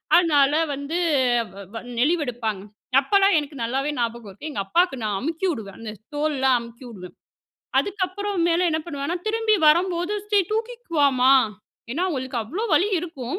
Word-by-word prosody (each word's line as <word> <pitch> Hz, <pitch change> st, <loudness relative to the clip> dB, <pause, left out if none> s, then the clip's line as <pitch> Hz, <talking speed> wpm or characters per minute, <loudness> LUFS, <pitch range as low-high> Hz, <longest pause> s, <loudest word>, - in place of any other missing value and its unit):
அதனால, 295 Hz, -5 st, +4 dB, 0.2 s
வந்து 285 Hz, +5 st, -4 dB, 0.6 s
வ் 200 Hz, 0 st, -10 dB
வ -, -, -5 dB, 0.2 s
நெலிவெடுப்பாங்க. 245 Hz, -, 0 dB, 0.4 s
அப்பலாம் 395 Hz, +5 st, +3 dB
எனக்கு 295 Hz, -1 st, -3 dB
நல்லாவே 270 Hz, +5 st, -1 dB
ஞாபகம் 230 Hz, -2 st, -3 dB
இருக்கு. 300 Hz, +11 st, -8 dB
எங்க 245 Hz, -, -5 dB
அப்பாக்கு 345 Hz, -, +2 dB
நான் 210 Hz, -2 st, -1 dB
அமுக்கிஉடுவேன், 310 Hz, -, -3 dB
அந்த 220 Hz, -2 st, -6 dB, 0.2 s
தோள்லாம் 270 Hz, -4 st, +2 dB
அமுக்கிவிடுவேன். 235 Hz, -6 st, -11 dB, 0.6 s
அதுக்கப்புறம் 400 Hz, -1 st, -1 dB
மேல 345 Hz, +2 st, +2 dB
என்ன 315 Hz, -, 0 dB
பண்ணுவேன்னா? 290 Hz, +1 st, -3 dB
திரும்பி 445 Hz, 0 st, +2 dB
வரும்போது" 350 Hz, +4 st, +3 dB, 0.2 s
சரி, 405 Hz, -2 st, +4 dB
தூக்கிக்குவாமா," 335 Hz, -, +1 dB, 0.6 s
ஏன்னா 325 Hz, +8 st, -1 dB
அவங்களுக்கு 260 Hz, -5 st, -3 dB
அவ்வளோ 355 Hz, -, -4 dB
வலி 400 Hz, -, +3 dB
இருக்கும், 305 Hz, -2 st, -5 dB
295 Hz, 135 wpm, -23 LUFS, 245-360 Hz, 0.6 s, அதனால